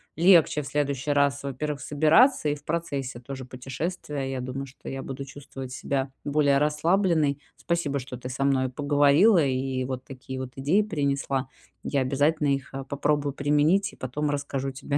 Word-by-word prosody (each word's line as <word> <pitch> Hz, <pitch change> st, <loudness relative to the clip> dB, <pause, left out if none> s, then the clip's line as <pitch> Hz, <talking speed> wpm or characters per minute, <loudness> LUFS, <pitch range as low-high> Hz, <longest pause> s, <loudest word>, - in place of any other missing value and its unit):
легче 165 Hz, -3 st, +5 dB
в 140 Hz, -, -8 dB
следующий 145 Hz, -1 st, -1 dB
раз, 140 Hz, 0 st, +2 dB
во-первых, 140 Hz, +2 st, -3 dB
собираться 155 Hz, -, +4 dB
и -, -, +1 dB
в 145 Hz, -, -15 dB
процессе 140 Hz, -7 st, -3 dB
тоже 130 Hz, +1 st, -7 dB
путешествия. 135 Hz, +2 st, -4 dB
Я 130 Hz, -1 st, -3 dB
думаю, 130 Hz, +2 st, -4 dB
что 130 Hz, -, -15 dB
я 135 Hz, 0 st, -4 dB
буду 135 Hz, 0 st, -6 dB
чувствовать 135 Hz, -1 st, -9 dB
себя 135 Hz, 0 st, -2 dB
более 145 Hz, -1 st, +3 dB
расслабленной. 150 Hz, 0 st, +2 dB, 0.2 s
Спасибо, 170 Hz, -5 st, -1 dB
что 130 Hz, 0 st, -7 dB
ты 125 Hz, +1 st, -7 dB
со 130 Hz, +2 st, -2 dB
мной 135 Hz, -2 st, +2 dB
поговорила 145 Hz, -, +4 dB
и 130 Hz, -1 st, -1 dB
вот 130 Hz, 0 st, -4 dB
такие 130 Hz, 0 st, -8 dB
вот 130 Hz, -1 st, -5 dB
идеи 145 Hz, +10 st, +2 dB
принесла. 140 Hz, -7 st, -1 dB, 0.4 s
Я 140 Hz, -, 0 dB
обязательно 145 Hz, +4 st, +1 dB
их, 135 Hz, 0 st, -5 dB
э, 135 Hz, -, -4 dB
попробую 145 Hz, +1 st, 0 dB
применить 150 Hz, +9 st, +2 dB
и -, -, -14 dB
потом 145 Hz, +4 st, -3 dB
расскажу 140 Hz, -1 st, -2 dB
тебе, 140 Hz, +2 st, -2 dB
140 Hz, 170 wpm, -26 LUFS, 135-150 Hz, 0.4 s, легче